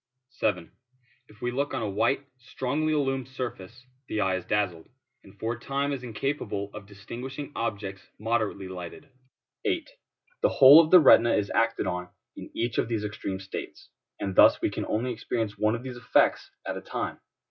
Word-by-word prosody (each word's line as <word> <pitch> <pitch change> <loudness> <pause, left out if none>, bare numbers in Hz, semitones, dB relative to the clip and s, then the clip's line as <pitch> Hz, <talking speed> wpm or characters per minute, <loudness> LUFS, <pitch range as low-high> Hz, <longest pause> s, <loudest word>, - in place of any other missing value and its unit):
7. 90 -9 -1 0.6
If 105 - -20
we 120 - 0
look 140 +2 -1
on 125 - -2
a - - -1
white, 115 +8 +1
strongly 145 +5 -2
illumined 135 -4 0
surface, 125 -2 -7 0.2
the 110 - -2
eye 95 -2 +2
is 95 - -5
dazzled, 95 -6 -1 0.3
and 100 +1 -17
for 115 +1 -1
a 120 - -9
time 140 +3 -1
is 135 - -4
incapable 115 -4 -3
of 105 -2 -9
distinguishing 125 +8 -7
objects 100 -4 -3 0.2
moderately 110 -3 -1
lighted. 90 -2 -8 0.6
8. 365 -6 -1 0.5
The - - +4
whole 140 +5 +9
of 155 - -3
the 180 - +9
retina 120 -6 +6
is 100 -1 -1
acted 115 0 +1
on 90 0 -3 0.3
in - - -9
each 115 -1 -1
of - - +1
these 115 -3 -2
extreme 100 -2 -4
states, 95 0 -8 0.3
and 95 -1 -3
thus - - +7
we - - 0
can - - -4
only 120 +4 -1
experience 110 -2 -3
one 110 +1 +1
of 120 - -7
these 130 -2 -7
effects 120 - +2 0.2
at - - -3
a - - -6
time. - - -4
115 Hz, 180 wpm, -27 LUFS, 100-130 Hz, 0.6 s, whole